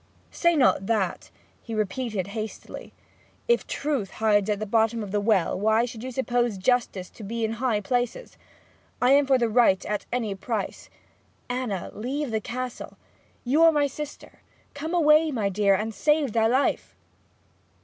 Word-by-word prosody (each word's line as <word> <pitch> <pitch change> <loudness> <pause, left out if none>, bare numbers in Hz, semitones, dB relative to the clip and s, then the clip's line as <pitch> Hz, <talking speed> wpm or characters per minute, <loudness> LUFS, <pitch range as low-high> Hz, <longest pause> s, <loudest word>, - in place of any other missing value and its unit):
'Say 340 -1 +2
not 250 -9 +3
that,' 205 -6 -1 0.3
he 230 - -6
replied 215 -1 -2
hastily. 215 +2 -7 0.6
'If 475 0 +2
truth 275 -10 -2
hides 210 -2 +2
at 210 - +1
the 215 - -4
bottom 225 +1 +1
of 200 -1 -8
a 205 - +2
well, 200 -4 +1
why 220 +3 +3
should 230 -2 -8
you 260 - -4
suppose 245 -4 0
justice 200 -3 0
to 220 - -12
be 225 +2 -2
in 220 - -2
high 230 -5 +1
places? 245 - -2 0.6
I 250 +1 +3
am 280 0 +5
for 270 -1 +4
the 240 -2 +1
right 220 -4 +3
at 210 0 -3
any 230 -5 -1
price. 200 +1 -4 0.6
Anna, 245 -8 -3
leave 260 +4 -3
the 220 -1 -1
Castle; 250 +2 -6 0.5
you 275 +6 +2
are 330 0 +8
my 295 -2 +2
sister; 295 +1 -8 0.3
come 315 +5 -4
away, 310 -1 +5
my 220 -8 -1
dear, 200 0 +3
and 220 +3 -3
save 300 -2 +1
thy 225 -1 +3
life!' 260 +4 0
230 Hz, 165 wpm, -25 LUFS, 210-265 Hz, 0.6 s, are